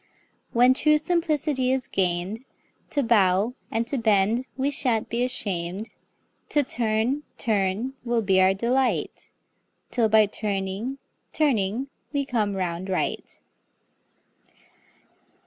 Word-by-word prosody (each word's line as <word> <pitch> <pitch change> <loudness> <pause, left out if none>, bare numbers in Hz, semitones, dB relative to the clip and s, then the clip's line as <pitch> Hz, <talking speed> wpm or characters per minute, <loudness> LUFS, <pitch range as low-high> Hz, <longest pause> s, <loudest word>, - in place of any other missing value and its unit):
When 245 +2 +5
true 305 +3 +4
simplicity 305 -5 0
is 260 0 -1
gain'd, 185 +5 0 0.5
To 285 - 0
bow 205 -1 +3 0.2
and 225 +1 -1
to 265 +2 -2
bend 220 +3 +2
we 275 +2 0
shan't 245 -6 +1
be 235 +1 0
asham'd, 195 -4 -2 0.6
To 295 -1 +3
turn, 235 +3 0 0.2
turn 210 +3 -1
will 235 -2 0
be 190 -1 +3
our 190 +1 +4
delight 250 +5 -1 0.6
'Till 235 -2 +2
by 215 0 +6
turning, 205 +4 -3 0.4
turning 245 -4 +1 0.2
we 285 -1 -1
come 215 -6 -1
round 180 0 -3
right. 185 - -3
230 Hz, 110 wpm, -25 LUFS, 195-260 Hz, 0.6 s, by